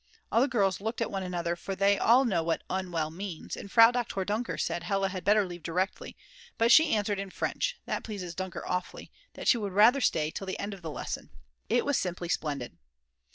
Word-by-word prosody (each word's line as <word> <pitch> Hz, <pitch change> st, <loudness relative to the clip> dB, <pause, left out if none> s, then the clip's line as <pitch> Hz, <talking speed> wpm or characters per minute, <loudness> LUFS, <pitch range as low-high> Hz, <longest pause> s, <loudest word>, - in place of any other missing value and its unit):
All 230 Hz, -, +4 dB
the 270 Hz, -, +4 dB
girls 195 Hz, -8 st, +1 dB
looked 225 Hz, +3 st, -3 dB
at 230 Hz, -, -1 dB
one 195 Hz, -, -2 dB
another, 175 Hz, -2 st, -2 dB
for 195 Hz, +2 st, -5 dB
they 200 Hz, +1 st, +3 dB
all 250 Hz, +4 st, +5 dB
know 190 Hz, -8 st, +1 dB
what 165 Hz, 0 st, -1 dB
unwell 175 Hz, -5 st, -2 dB
means, 180 Hz, -1 st, -6 dB
and 200 Hz, -, -9 dB
Frau 230 Hz, 0 st, +8 dB
Doktor 240 Hz, -6 st, -2 dB
Dunker 215 Hz, +5 st, -2 dB
said -, -, -2 dB
Hella 195 Hz, +2 st, 0 dB
had 185 Hz, -1 st, -5 dB
better 205 Hz, 0 st, +4 dB
leave 175 Hz, -1 st, -8 dB
directly, 180 Hz, +5 st, -3 dB, 0.4 s
but 230 Hz, +1 st, +3 dB
she 315 Hz, -1 st, +6 dB
answered 205 Hz, -1 st, -1 dB
in 195 Hz, 0 st, -4 dB
French -, -, -2 dB
that -, -, -3 dB
pleases 190 Hz, -6 st, -6 dB
Dunker 185 Hz, 0 st, -5 dB
awfully 180 Hz, 0 st, -4 dB, 0.2 s
that -, -, -6 dB
she 240 Hz, -, +5 dB
would 200 Hz, -3 st, -4 dB
rather 230 Hz, +7 st, +6 dB
stay 155 Hz, -8 st, +1 dB
till 195 Hz, -, -6 dB
the 190 Hz, -, -3 dB
end 200 Hz, +1 st, -4 dB
of 195 Hz, -, -10 dB
the 165 Hz, -, -5 dB
lesson. -, -, -5 dB, 0.4 s
It 240 Hz, +2 st, +2 dB
was 285 Hz, -1 st, +2 dB
simply 175 Hz, -1 st, -4 dB
splendid! 145 Hz, -7 st, -3 dB
195 Hz, 215 wpm, -29 LUFS, 175-220 Hz, 0.4 s, Frau